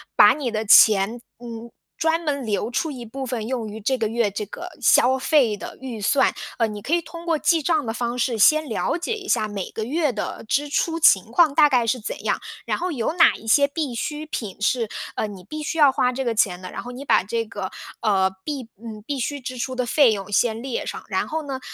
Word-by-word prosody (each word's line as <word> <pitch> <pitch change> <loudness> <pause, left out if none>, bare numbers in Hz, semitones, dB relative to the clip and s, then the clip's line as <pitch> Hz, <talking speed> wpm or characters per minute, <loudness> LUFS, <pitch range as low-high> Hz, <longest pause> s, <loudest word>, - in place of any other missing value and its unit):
把 - - +7
你 275 -5 -3
的 220 0 -3
钱， 215 +2 +6 0.2
嗯， 235 -1 -8 0.3
专 325 +1 +1
门 280 -3 -2
留 215 +2 -2
出 320 +6 -1
一 250 -5 -7
部 265 +4 -7
分 235 -3 -3
用 240 -4 -3
于 215 +1 -8
这 245 +6 0
个 225 - 0
月 225 -2 0
这 210 +2 -4
个 - - -8
消 260 +2 +4
费 260 -7 +3
的 - - -9
预 245 -5 -7
算。 270 +7 +3 0.2
呃， 230 - +2
你 210 -1 -7
可 295 +10 -3
以 345 - 0
通 335 +1 -10
过 325 -2 +2
记 330 +1 +2
账 310 -3 +1
的 225 - -3
方 240 +1 -3
式 240 -2 -1
先 310 +8 +5
了 235 +8 -1
解 355 +6 -3
一 410 -3 -7
下 215 - +1
每 200 -3 -5
个 220 - -5
月 295 +4 0
的 210 0 -5
支 290 +5 0
出 330 +3 -1
情 195 - +5
况 320 0 +4
大 300 0 +6
概 245 -4 +2
是 250 +2 0
怎 215 - -6
样， - - 0 0.3
然 - - -1
后 360 0 -2
有 250 +1 -2
哪 350 - +5
一 - - -13
些 280 +5 +5
必 285 -4 -3
需 300 +6 -4
品 215 -11 -6
是， 230 +1 +1 0.3
呃， - - -1
你 195 -3 -10
必 305 +10 -7
须 325 - -3
要 290 -4 +6
花 250 -1 +1
这 265 +1 -3
个 235 - 0
钱 180 -5 +1
的， 185 - -8
然 - - -6
后 245 - -8
你 265 +3 -8
把 - - +3
这 230 +3 -2
个， 195 -3 -6 0.3
呃， 195 -4 +2
必 285 -4 -4 0.2
嗯， 215 -2 -8
必 285 -2 -3
需 285 +3 -2
支 255 -1 -7
出 255 +2 -3
的 250 -1 -1
费 265 -2 +4
用 200 -1 -4
先 225 +2 +1
列 260 -2 -3
上， - - -6
然 - - -1
后 315 0 -3
呢， 270 -2 -4
250 Hz, 260 characters per minute, -23 LUFS, 220-295 Hz, 0.3 s, 把